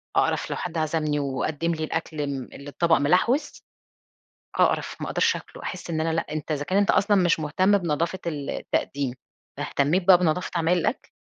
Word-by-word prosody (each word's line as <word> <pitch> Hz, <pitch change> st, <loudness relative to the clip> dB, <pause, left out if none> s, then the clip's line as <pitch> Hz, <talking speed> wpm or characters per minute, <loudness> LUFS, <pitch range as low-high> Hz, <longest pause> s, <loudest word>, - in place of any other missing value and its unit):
أقرف -, -, +1 dB
لو -, -, -2 dB
حد 175 Hz, -2 st, -4 dB
عزمني 155 Hz, -1 st, 0 dB
وقدم 145 Hz, +4 st, -1 dB
لي 155 Hz, -, -4 dB
الأكل 160 Hz, -1 st, -3 dB
ال 140 Hz, -3 st, -4 dB
اللي 140 Hz, +1 st, -9 dB
الطبق 165 Hz, +3 st, +2 dB
مِلحوِس، 210 Hz, -, +1 dB, 0.9 s
أقرَف، -, -, +1 dB
ما -, -, -3 dB
أقدرش -, -, +2 dB
آكله، -, -, -9 dB
أحس 180 Hz, -2 st, -6 dB
إن 160 Hz, -2 st, -1 dB
أنا 160 Hz, 0 st, 0 dB
لأ 165 Hz, -, 0 dB
أنت 155 Hz, 0 st, -4 dB
إذا 145 Hz, -1 st, -1 dB
كان 185 Hz, +6 st, 0 dB
أنت 200 Hz, 0 st, +4 dB
أصلًا 205 Hz, +1 st, +3 dB
مش 175 Hz, -3 st, +3 dB
مهتم 185 Hz, +7 st, +2 dB
بنضافة 170 Hz, +1 st, -1 dB
التقديم، 140 Hz, -3 st, -2 dB, 0.4 s
فاهتميت 170 Hz, +6 st, 0 dB
بقى 185 Hz, -2 st, +9 dB
بنظافة 175 Hz, 0 st, 0 dB
عمايل 170 Hz, +1 st, +2 dB
الأكل؟ 170 Hz, -, -2 dB
160 Hz, 175 wpm, -25 LUFS, 150-180 Hz, 0.9 s, بقى